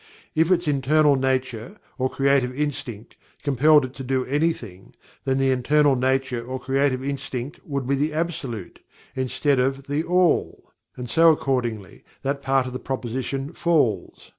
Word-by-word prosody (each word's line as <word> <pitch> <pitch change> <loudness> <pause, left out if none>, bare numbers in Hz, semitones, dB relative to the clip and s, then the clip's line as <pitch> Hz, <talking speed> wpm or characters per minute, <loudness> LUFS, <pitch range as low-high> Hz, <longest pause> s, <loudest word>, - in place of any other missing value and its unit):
If 160 +2 +2
its 175 -3 +2
"internal 145 +1 +3
nature," 130 - -2 0.2
or 130 +1 +1
"creative 135 -1 +1
instinct," 125 -7 -4 0.3
compelled 145 +1 +4
it 130 - -9
to 135 - -8
do 130 0 -1
anything, 130 - -2 0.3
then 135 0 +1
the 135 0 +2
"internal 140 +3 +3
nature" 130 -1 0
or 130 +2 -5
"creative 135 -1 0
instinct" 135 -1 -4
would 140 -3 -3
be 135 - 0
the 145 +3 0
Absolute, 150 - -4 0.4
instead 130 +1 0
of 135 +2 0
THE 145 +2 -1
ALL, 180 0 +1 0.3
and 125 0 -5
so 165 +7 +5
accordingly 120 -9 -2 0.2
that 140 +1 -2
part 135 -1 +1
of 125 - -6
the 130 - -4
proposition 130 +3 -4
falls. 145 - 0
135 Hz, 150 wpm, -23 LUFS, 125-145 Hz, 0.4 s, so